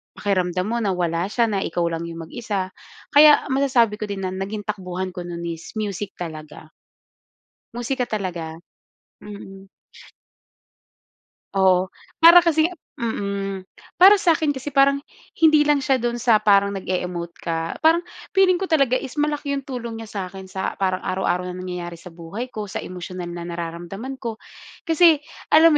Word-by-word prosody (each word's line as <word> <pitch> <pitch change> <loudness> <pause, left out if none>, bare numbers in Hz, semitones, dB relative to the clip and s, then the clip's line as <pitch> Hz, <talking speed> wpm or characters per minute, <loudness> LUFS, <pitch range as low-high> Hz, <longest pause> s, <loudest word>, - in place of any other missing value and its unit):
pakiramdam 185 -2 0
mo 235 - 0
na 200 -5 0
wala 170 0 -1
siya, 230 +2 +1
na 200 - 0
ikaw 175 -2 -1
lang 165 0 -4
yung 165 0 -7
mag-isa. 195 -1 -4 0.4
Kaya 295 0 +7
masasabi 255 -6 +2
ko 215 - -3
din 200 -1 -5
na 185 - -2
naging 200 +2 -4
takbuhan 185 -2 -4
ko 180 -1 -7
no'n 170 -1 -6
is 165 +4 -9
music 205 -2 -4
talaga. 155 -2 -8 1.0
Musika 250 +1 -1
talaga. 180 -7 -4 0.7
Mm. 195 -2 -11 1.9
Oo. 190 -1 +4 0.3
Para 340 +1 +9
kasing 320 -1 +3 0.3
Mm. 200 -5 -3 0.4
Para 400 +3 +9
sa'kin 325 -6 +2
kasi 265 +2 -6
parang, 275 0 +5 0.4
hindi 310 -2 +6
lang 295 -1 +2
siya 265 -3 +2
doon 240 0 -1
sa 230 -3 +3
parang 200 -1 +4
nag-e-emote 180 -3 -4
ka, 165 0 -3
parang 325 +2 +4 0.3
feeling 380 -2 +4
ko 385 - -2
talaga 275 -7 +3
is 260 - -7
malaki 295 -1 -1
yung 280 - -2
tulong 235 -4 -6
niya 225 - -9
sa'kin 190 -1 -6
sa, 190 0 -3
parang 185 -1 0
araw-araw 180 -1 0
na 180 - -5
nangyayari 180 -1 -5
sa 170 +1 -11
buhay 175 +9 -7
ko, 215 -4 -5
sa 195 - -5
emosyonal 180 0 -7
na 170 0 -6
nararamdaman 175 +9 -6
ko. 230 -4 -6 0.4
Kasi, 325 -2 +4 0.3
alam 315 0 +7
200 Hz, 155 wpm, -22 LUFS, 180-265 Hz, 1.9 s, Para